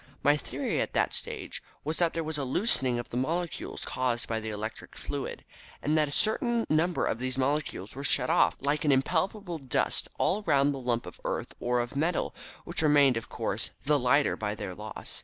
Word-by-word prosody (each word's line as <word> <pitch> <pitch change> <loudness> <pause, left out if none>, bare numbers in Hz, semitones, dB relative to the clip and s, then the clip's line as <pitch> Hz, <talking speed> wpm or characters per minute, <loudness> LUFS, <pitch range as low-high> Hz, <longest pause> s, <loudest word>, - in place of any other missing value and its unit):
My 145 +1 +6
theory 145 - -2
at - - -3
that - - +2
stage - - -3 0.2
was 155 +1 -2
that 170 -2 +2
there 165 - 0
was 155 -1 -3
a - - -1
loosening 130 - +2
of 120 - -5
the 120 - -2
molecules 165 +6 -2
caused 125 -2 -1
by 115 -1 -1
the 110 0 -5
electric 110 +1 -6
fluid, - - -5 0.3
and 150 +2 +1
that 155 -1 +3
a - - -6
certain 230 - +2
number 165 +3 +2
of 115 - -1
these 130 +1 -2
molecules 135 -7 -1
were 140 - -6
shed 135 -3 +3
off - - +4
like 145 +2 0
an 150 - +4
impalpable 175 +6 0
dust, 130 -4 0
all 205 - +2
round 145 -6 +3
the 135 - -5
lump 120 -2 -1
of - - -10
earth - - -3
or 125 0 +1
of 120 +2 -3
metal, 165 +5 0 0.3
which 170 -1 -2
remained, 145 -4 +5
of 115 - -4
course, - - -1 0.2
the 145 0 +4
lighter 140 +3 +3
by 105 -1 -2
their 95 - -5
loss. 105 +2 -7
140 Hz, 205 wpm, -29 LUFS, 125-160 Hz, 0.3 s, My